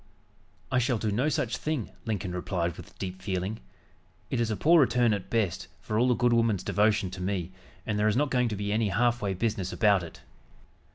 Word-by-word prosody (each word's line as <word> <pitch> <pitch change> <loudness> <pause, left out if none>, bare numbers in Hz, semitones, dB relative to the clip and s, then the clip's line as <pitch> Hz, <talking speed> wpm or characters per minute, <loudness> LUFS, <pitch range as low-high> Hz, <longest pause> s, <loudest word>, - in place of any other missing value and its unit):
"I 130 - +3
shall 125 -1 +1
do 110 0 -1
no 125 +9 +1
such 125 -4 -1
thing," 150 -8 -3
Lincoln 105 -5 -2
replied 90 -2 -2
with - - -13
deep 95 0 -6
feeling. 95 +2 -3 0.7
"It - - 0
is 115 -1 +1
a 110 - -1
poor 165 +1 +5
return, 120 -3 +3
at 100 -3 -4
best, 110 -7 -1
for 110 0 -2
all 125 - +4
the 125 - +3
good 120 0 +2
woman's 115 -4 +2
devotion 105 -2 +2
to 95 -1 -7
me, 90 -2 -2 0.3
and 105 -2 -1
there 105 - +3
is 110 +2 +2
not 145 0 +1
going 125 -1 +2
to 105 - -3
be 100 0 -3
any 110 -1 +1
half 120 +4 +1
way 100 -2 -1
business 105 -2 -1
about 100 -4 +3
it." 85 -2 -10
110 Hz, 215 wpm, -28 LUFS, 95-120 Hz, 0.7 s, poor